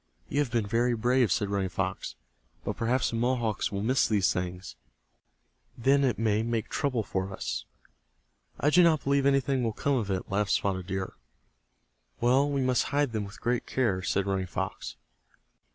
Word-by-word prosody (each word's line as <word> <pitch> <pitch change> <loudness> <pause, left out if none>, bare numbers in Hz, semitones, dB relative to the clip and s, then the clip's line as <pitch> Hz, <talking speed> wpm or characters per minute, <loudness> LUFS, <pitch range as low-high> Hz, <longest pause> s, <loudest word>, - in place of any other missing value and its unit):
"You 145 - 0
have 145 -4 +1
been 115 -3 0
very 120 +3 +1
brave," 120 +1 +2
said 100 -3 0
Running 100 -2 0
Fox. - - -3 0.5
"But - - -3
perhaps 120 +2 0
the - - -3
Mohawks 120 -4 0
will 100 0 -3
miss 130 +4 +3
these 100 -4 +2
things. 90 -5 -5 1.0
Then 135 +4 +3
it 125 -5 +1
may 110 -1 +1
make 115 -1 -2
trouble 130 -6 0
for 95 -1 -3
us." 60 -10 -4 0.9
"I 145 - +2
do 180 - +6
not 165 -4 +4
believe 140 0 +2
anything 135 -1 +2
will 115 -2 0
come 140 +4 0
of 105 -5 -2
it," 95 -1 -2
laughed 100 0 0
Spotted 95 -2 -1
Deer. 95 -1 -3 1.1
"Well, 130 +4 +3
we 140 -1 0
must 130 -1 +2
hide 145 -2 0
them 110 -2 -2
with 105 - -11
great 120 0 -1
care," 110 -8 0
said 95 +1 0
Running 95 -1 -1
Fox. 95 +1 -4
115 Hz, 175 wpm, -28 LUFS, 100-130 Hz, 1.1 s, do